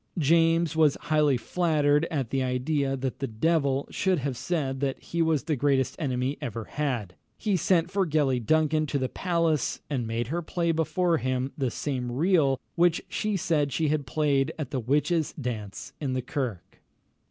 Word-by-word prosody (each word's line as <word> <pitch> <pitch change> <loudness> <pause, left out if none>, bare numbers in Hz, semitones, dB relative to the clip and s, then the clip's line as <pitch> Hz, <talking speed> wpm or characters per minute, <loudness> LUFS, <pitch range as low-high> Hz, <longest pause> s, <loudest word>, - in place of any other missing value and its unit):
James 165 +1 +3
was 155 -3 +4
highly 150 -4 +2
flattered 150 0 +1
at 135 -8 -2
the 135 - +1
idea 135 +2 0
that 130 -1 -3
the 135 - -2
devil 140 +3 +1
should 190 -1 +1
have 135 -2 -2
said 135 -2 -2
that 135 -1 -1
he 170 - -3
was 160 -3 +2
the 155 - 0
greatest 135 -1 +1
enemy 130 -4 -1
he 145 - -4
ever 115 -5 -4
had. 120 -8 -3 0.2
He 210 -3 0
sent 175 0 +2
for 195 -2 +1
Gellie 140 -6 +1
Duncan 155 +2 +2
to 140 - -1
the 130 -1 0
palace, 165 -3 0
and 125 -5 -1
made 115 +1 -2
her 170 +3 -1
play 170 0 -1
before 165 +1 +1
him 130 -1 -1
the 135 -4 -1
same 125 -1 -3
reel 145 -2 +2
which 170 -1 +2
she 215 -2 -1
had 155 -3 0
played 140 0 +1
at 150 -5 -5
the 135 - -1
witches' 150 +6 +1
dance 110 -6 -5
in 135 -3 -1
the 130 -1 -2
kirk. 125 - -5
145 Hz, 175 wpm, -27 LUFS, 130-165 Hz, 0.2 s, was